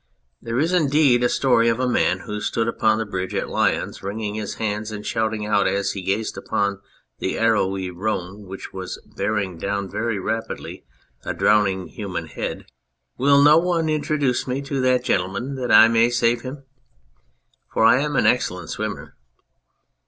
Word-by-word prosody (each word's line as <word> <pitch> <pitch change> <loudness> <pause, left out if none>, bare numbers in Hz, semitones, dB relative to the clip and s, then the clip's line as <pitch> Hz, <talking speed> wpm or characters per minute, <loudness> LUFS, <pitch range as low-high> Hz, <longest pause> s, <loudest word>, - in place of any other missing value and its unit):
There 115 +1 -3
is, 160 +6 +1
indeed, 145 -6 +3
a 120 - +3
story 115 -3 +3
of 115 +1 0
a 130 - +1
man 95 -6 +1
who 105 0 -5
stood 115 +1 -1
upon 110 -1 +2
the 110 - -2
bridge 95 -2 -4
at - - -2
Lyons - - 0
wringing 105 +1 -4
his 105 -1 -4
hands 105 0 -3
and 105 -1 -7
shouting 110 -2 -1
out 105 -2 +2
as 100 0 0
he 100 - -5
gazed 100 +4 -2
upon 100 -1 -1 0.4
the - - -2
arrowy 95 -4 +1
Rhone 100 +1 -4
which 95 +1 -8
was 95 -1 -6 0.2
bearing 100 -5 -2
down 100 +2 -2
very 115 -2 -1
rapidly 110 +4 -4 0.4
a - - -4
drowning 100 -3 +2
human 90 -5 -5
head: 75 - -5 0.3
" - - -52
Will 140 +2 +5
no 150 +2 +7
one 170 -2 0
introduce 145 -5 0
me 130 +1 -1
to 140 -1 -2
that 130 -1 +2
gentleman 100 +7 -1
that 130 -2 -3
I 110 +1 +9
may 115 +1 +3
save 120 0 +1
him? 135 +3 -8 1.1
For - - +1
I 120 - +6
am 150 0 -2
an - - +2
excellent 90 -9 +1
swimmer." - - -5
110 Hz, 175 wpm, -22 LUFS, 100-125 Hz, 1.1 s, I